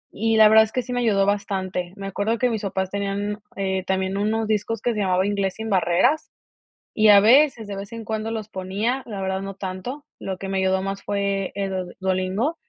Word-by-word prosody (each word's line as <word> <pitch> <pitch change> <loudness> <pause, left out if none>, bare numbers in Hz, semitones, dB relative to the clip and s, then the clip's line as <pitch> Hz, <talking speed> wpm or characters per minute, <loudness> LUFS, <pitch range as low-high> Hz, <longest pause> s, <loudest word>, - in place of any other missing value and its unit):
y 225 +1 +1
la 215 -1 +8
verdad 220 +1 +7
es 220 - -12
que 255 - -1
sí 250 +1 -5
me 245 - 0
ayudó 200 -4 +3
bastante. 190 -3 -2
Me 200 -1 -8
acuerdo 205 +4 -1
que 250 0 +1
mis 220 - -2
papás 190 -1 -2
tenían, 200 +1 -2 0.2
eh, 190 -1 -1
también 190 0 -1
unos 215 +2 0
discos 215 +1 -1
que 240 0 0
se 210 - -3
llamaban 185 -1 +2
Inglés 200 -2 -1
sin 220 -1 -5
barreras, 190 - +2 0.7
y 215 0 +4
a 205 -1 +9
veces, 240 0 +5
de 200 - -5
vez 200 +2 -7
en 230 -1 -6
cuando 220 0 -3
los 220 -2 -4
ponía, 210 +7 -2
la 205 -4 -6
verdad, 190 0 -2
no 195 0 -6
tanto, 195 +10 -6 0.2
lo 190 -1 -4
que 195 - -6
me 195 0 -1
ayudó 190 0 +2
más 195 0 -4
fue 200 -1 -1
el 195 -1 -2
Duo 185 -1 -3
Duolingo. 190 - 0
200 Hz, 220 wpm, -23 LUFS, 190-220 Hz, 0.7 s, a